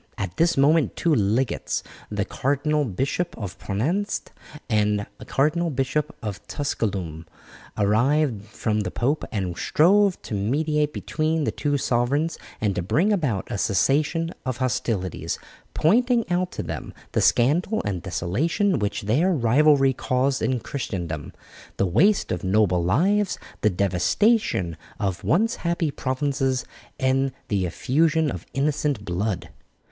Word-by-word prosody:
At 95 -4 -4
this 165 -1 +3
moment 150 +2 +3
two 170 - +1
legates, 115 +2 0 0.3
the 105 -2 -1
Cardinal 145 +4 0
Bishop 135 - -2
of 100 -6 -6
Preneste 165 - -2 0.4
and 105 -2 +1
the - - -9
Cardinal 160 +5 +1
Bishop 140 +3 -1
of 105 -2 -4
Tusculum, 95 - -3 0.5
arrived 115 +3 +2
from 110 0 -2
the 100 -4 -1
pope 140 +10 0
and 95 -5 -2
strove 195 - +3
to - - -7
mediate 150 +8 0
between 155 +1 -1
the - - 0
two 145 -1 -1
sovereigns 135 +6 0 0.2
and 105 -2 +1
to 90 - -2
bring 170 - +2
about 140 - -1
a 100 - -2
cessation 150 - +1
of 130 -2 -3
hostilities, 120 -7 -2 0.4
pointing 240 +7 +3
out 180 +1 0
to - - -4
them - - -6 0.2
the - - +1
scandal 165 - +2
and 95 -4 -2
desolation 150 - 0
which 105 -1 -2
their 140 - +2
rivalry 135 0 +4
caused 130 +2 0
in 130 -2 0
Christendom, 85 - -4 0.5
the - - +2
waste 195 - +3
of - - -2
noble 95 -2 +2
lives, 185 - +2 0.2
the 105 - +4
devastation 95 - +1 0.2
of 95 -4 -2
once 220 +8 +2
happy 170 -3 -1
provinces, 135 -1 -1 0.3
and 135 0 +2 0.2
the 95 -3 +1
effusion 155 - +1
of 90 - -7
innocent 140 -5 0
blood. 95 +2 -2
135 Hz, 135 wpm, -24 LUFS, 105-155 Hz, 0.5 s, rivalry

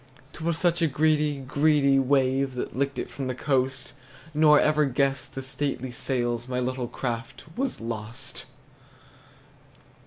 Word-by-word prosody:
'T 165 - -9
was 170 -1 0
such 170 0 +1
a 165 - +4
greedy, 150 0 +2
greedy 140 0 +3
wave 135 0 +2
That 125 - -4
licked 140 +2 -1
it - - -3
from 135 -2 -5
the 130 - -2
coast; 130 -1 -1 0.4
Nor 150 -1 +6
ever 150 0 +3
guessed 135 +1 -1
the 135 - -4
stately 130 -1 -3
sails 120 -1 -1
My 125 0 -2
little 125 0 -2
craft 120 -1 -5
was 265 +1 -2
lost! 115 +2 -5
135 Hz, 145 wpm, -26 LUFS, 125-150 Hz, 0.4 s, Nor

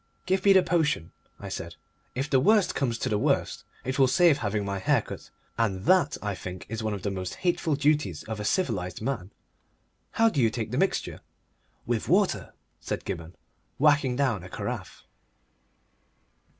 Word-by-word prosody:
"Give 185 +1 +1
me 200 - +8
the 190 -1 +6
potion," 155 - 0 0.3
I - - -7
said. - - -6 0.4
"If 135 +3 -1
the 135 -3 +3
worst 210 +7 +4
comes 120 -4 -1
to - - -2
the 105 - +1
worst - - 0 0.2
it 130 +3 -2
will 135 - +6
save 165 +1 +4
having 105 -2 -1
my 100 0 -2
hair 95 - +2
cut, - - -9 0.3
and 95 -5 0
that 180 -7 +4
I 105 -1 -1
think 90 0 -7
is 115 0 -4
one 110 -1 -1
of 95 - -8
the 100 - -1
most 95 -1 -4
hateful 175 -3 +1
duties 145 - +1
of 110 -1 -5
a - - -3
civilised 100 - -1
man. 110 -8 -2 0.8
How 225 - +4
do 155 -12 +1
you 115 - +4
take 110 -1 -4
the 125 - 0
mixture?" 195 - -1 0.6
"With - - -2
water," - - +1 0.2
said - - -4
Gibberne, 85 +1 -5 0.4
whacking 145 -3 +3
down 125 -9 0
a 90 - -9
carafe. - - -5
125 Hz, 175 wpm, -27 LUFS, 100-150 Hz, 0.8 s, me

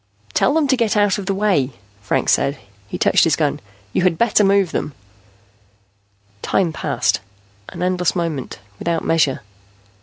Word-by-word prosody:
"Tell 285 - +2
them 315 -3 +2
to 265 - +4
get 230 -4 0
out 205 0 +2
of 195 - -7
the 195 - +1
way," 185 -11 +1 0.3
Franks 100 - 0
said. 140 +2 +1 0.3
He - - -5
touched - - +3
his - - +3
gun. - - 0 0.3
"You - - +1
had 180 -2 +2
better 225 -2 +3
move 195 -3 +3
them." 150 - -3 1.5
Time 175 -4 0
passed, - - 0 0.5
an 175 - -6
endless 180 -1 0
moment, 165 -7 -3 0.2
without 165 -1 -2
measure. 155 -5 +1
180 Hz, 155 wpm, -19 LUFS, 160-205 Hz, 1.5 s, to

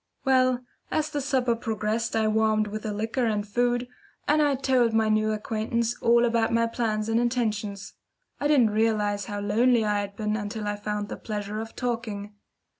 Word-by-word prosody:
Well, 255 -1 +3 0.3
as 310 -1 -1
the 290 - -2
supper 255 -3 +1
progressed 225 0 -2
I 220 -1 +2
warmed 215 0 +2
with 210 +1 -5
the 215 - -3
liquor 225 +4 -1
and 210 -2 0
the - - -15
food, 245 +3 0 0.4
and 305 +1 +4
I 290 -2 +3
told 255 -3 +2
my 220 -1 +3
new 215 0 +2
acquaintance 225 +2 -1
all 235 +1 +4
about 230 -1 +1
my 230 0 +3
plans 220 -2 -1
and 225 +1 +2
intentions. 215 -5 -2 0.5
I 290 - +1
didn't 260 -8 +4
realise 210 -2 +1
how 205 +1 -4
lonely 225 +3 +3
I 210 -1 +1
had 200 0 -5
been 215 0 -1
until 210 0 -4
I 205 - -1
found 210 0 -3
the - - -6
pleasure 210 -1 -4
of 225 0 -7
talking. 225 -4 -3
220 Hz, 190 wpm, -26 LUFS, 210-240 Hz, 0.5 s, and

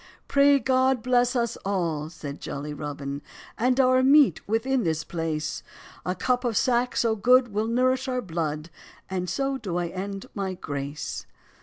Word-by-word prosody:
"Pray 280 0 +5
God 260 -1 +2
bless 245 0 +2
us 235 -1 0
all," 170 -6 -2
said 145 -3 -8
jolly 145 +2 -5
Robin, 145 -1 -5 0.3
"And 250 +3 +1
our 255 0 +5
meat 275 - +5
within 245 +5 +1
this 160 -2 0
place; 160 -2 -3 0.5
A 180 - 0
cup 250 +6 0
of 235 -3 0
sack 245 0 +2
so 230 -2 +2
good 250 +3 +4
will 215 +2 0
nourish 255 +3 +1
our 255 -1 -1
blood, 160 -2 -3 0.4
And 180 -1 -2
so 270 -1 -1
do 185 -7 -3
I 175 -1 -1
end 195 +2 -5
my 190 -2 -3
grace." 145 -2 -5
215 Hz, 160 wpm, -26 LUFS, 165-255 Hz, 0.5 s, Pray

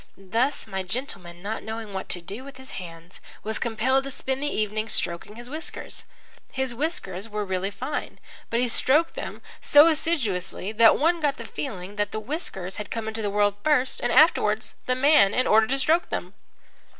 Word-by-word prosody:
Thus, 230 +9 0
my 190 0 -3
gentleman, 185 -4 -5
not 215 +2 -3
knowing 220 -2 -6
what 190 - -5
to 175 - -2
do 200 +8 -6
with 275 -1 -11
his 265 0 -10
hands, 170 -1 -9 0.2
was 220 +1 -2
compelled 240 +4 +1
to - - -4
spend 265 0 -3
the 295 - 0
evening 215 -3 -1
stroking 185 +3 -2
his 240 +1 -9
whiskers. 310 +5 -6 0.5
His 265 -2 -1
whiskers 230 - -3
were 210 -1 -2
really 190 0 -1
fine, 260 +9 -5 0.3
but 230 - +1
he 250 - +2
stroked 300 +7 +3
them - - -6 0.2
so 295 +1 +8
assiduously 215 - -1
that 225 +1 +6
one 335 +3 +3
got 295 -2 +1
the - - -7
feeling 200 -6 -6
that 205 0 0
the 215 - -1
whiskers 210 - -4
had 210 - -5
come 225 -1 -3
into 220 0 -3
the 205 - 0
world 205 0 +3
first 290 -4 +2
and 240 - 0
afterwards 220 -9 +4
the 255 - +2
man 255 -7 +5
in 255 - +2
order 220 +1 +5
to 270 - +1
stroke 320 +6 +2
them. 180 +2 -4
225 Hz, 190 wpm, -25 LUFS, 200-270 Hz, 0.5 s, so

